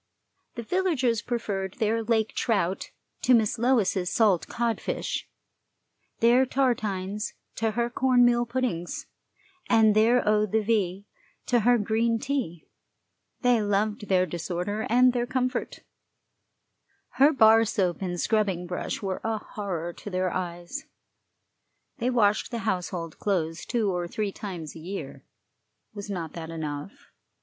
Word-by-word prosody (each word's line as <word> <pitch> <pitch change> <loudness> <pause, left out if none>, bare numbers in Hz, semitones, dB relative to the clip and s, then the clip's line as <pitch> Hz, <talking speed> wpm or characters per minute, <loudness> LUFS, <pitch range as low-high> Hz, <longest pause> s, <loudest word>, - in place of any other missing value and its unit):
The 235 - -5
villagers 265 - +1
preferred 200 -6 -3
their 225 -1 +1
lake 220 -1 0
trout 195 -5 0 0.3
to 250 - +5
Miss 220 0 +1
Lois's 220 -7 +2
salt 205 -7 +3
codfish, 235 -1 -2 0.9
their 240 +3 +6
tartines 210 -7 -1 0.2
to 225 - +1
her 235 +1 0
corn 245 0 +3
meal 240 0 +3
puddings, 235 -9 -2 0.6
and 220 -2 +5
their 230 +2 +4
eau 210 0 +3
de 220 +2 +1
vie 200 -3 0 0.4
to 245 - +3
her 240 +2 +4
green 225 +2 +1
tea; 225 - -3 0.7
they 245 -3 +3
loved 210 +1 0
their 185 -1 +3
disorder 180 +5 -3
and 250 +2 +5
their 240 -1 -1
comfort; 255 0 -2 1.4
her 285 +3 +7
bar 225 -5 +6
soap 190 -5 -1
and 175 -2 -3
scrubbing 200 -5 +1
brush 180 +4 -4
were 190 -1 -3
a 225 0 0
horror 185 -5 -5
to 205 - -9
their 185 -1 -1
eyes. 175 - -5 1.1
They 245 - +1
washed 215 -4 +2
the 230 -4 -5
household 180 -4 -3
clothes 165 -5 -1
two 225 -5 +1
or 175 -1 -2
three 205 +3 -2
times 180 -7 -7
a - - -9
year. 190 +5 -7 0.7
Was 205 -1 -7
not 170 -5 -4
that 165 -1 -7
enough? 155 +2 -6
215 Hz, 135 wpm, -26 LUFS, 185-235 Hz, 1.4 s, her